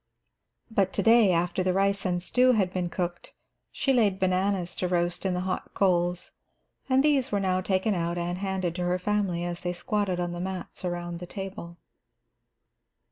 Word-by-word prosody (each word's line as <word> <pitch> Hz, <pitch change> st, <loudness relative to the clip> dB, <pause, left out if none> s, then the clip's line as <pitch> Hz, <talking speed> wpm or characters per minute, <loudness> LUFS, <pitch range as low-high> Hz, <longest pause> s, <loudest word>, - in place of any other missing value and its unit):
But 195 Hz, -3 st, +1 dB
to -, -, 0 dB
day, 225 Hz, -3 st, +6 dB
after 175 Hz, +2 st, +1 dB
the 185 Hz, 0 st, +1 dB
rice 195 Hz, 0 st, +1 dB
and 175 Hz, -1 st, -1 dB
stew 255 Hz, +6 st, +4 dB
had 190 Hz, -5 st, +1 dB
been 180 Hz, -1 st, -1 dB
cooked, 175 Hz, -1 st, -4 dB, 0.4 s
she 270 Hz, -, +1 dB
laid 205 Hz, -6 st, +2 dB
bananas 185 Hz, -1 st, 0 dB
to 180 Hz, -, 0 dB
roast 175 Hz, +1 st, 0 dB
in 185 Hz, -, 0 dB
the 180 Hz, -, -1 dB
hot 185 Hz, 0 st, -4 dB
coals, 175 Hz, -2 st, +1 dB, 0.6 s
and 265 Hz, +1 st, +4 dB
these 285 Hz, -4 st, +2 dB
were 205 Hz, -, +1 dB
now 185 Hz, -1 st, +1 dB
taken 190 Hz, +3 st, +1 dB
out 170 Hz, -1 st, -1 dB
and 175 Hz, +1 st, -2 dB
handed 190 Hz, -3 st, -2 dB
to 180 Hz, -, -1 dB
her 180 Hz, +1 st, +1 dB
family 185 Hz, -2 st, -1 dB
as 175 Hz, 0 st, -4 dB
they 175 Hz, 0 st, -2 dB
squatted 190 Hz, 0 st, -1 dB
on 175 Hz, -1 st, -1 dB
the 175 Hz, 0 st, -5 dB
mats 185 Hz, 0 st, -6 dB
around 175 Hz, -1 st, -3 dB
the 180 Hz, -, -8 dB
table. 190 Hz, -3 st, -7 dB
185 Hz, 185 wpm, -27 LUFS, 175-200 Hz, 0.6 s, day